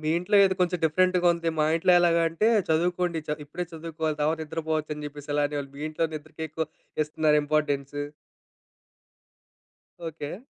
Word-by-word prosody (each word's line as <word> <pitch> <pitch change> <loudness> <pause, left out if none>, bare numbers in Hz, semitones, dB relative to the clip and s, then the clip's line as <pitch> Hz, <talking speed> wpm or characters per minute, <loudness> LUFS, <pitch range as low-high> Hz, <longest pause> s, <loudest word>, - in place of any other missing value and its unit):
మీ 155 0 -1
ఇంట్లో 180 +4 +1
ఏదొ 190 -1 +2
కొంచెం 180 0 +2
డిఫరెంట్‌గా 180 +2 +3
ఉందె. 170 -1 -1
మా 150 - +4
ఇంట్లో 180 +2 +3
ఎలాగంటే, 170 +3 +3 0.2
చదువుకోండి 175 +1 +1
చ 150 - 0
ఇప్పుడే 175 +5 -5
చదువుకోవాలి. 160 -1 -3
తవత 155 +2 +1
నిద్రపోవచ్చని 155 -1 -3
చెప్పేసి 145 0 -9
అలానేవాళు. 145 -1 -1
మీ 145 - -7
ఇంట్లో 165 +1 0
నిద్రకెక్కువ 155 +1 -5 0.4
ఇస్తన్నారు 150 0 +2
ఇంపార్టెన్స్. 145 -2 0 2.1
ఓకే. 160 +6 -7
160 Hz, 130 wpm, -27 LUFS, 150-170 Hz, 2.1 s, మా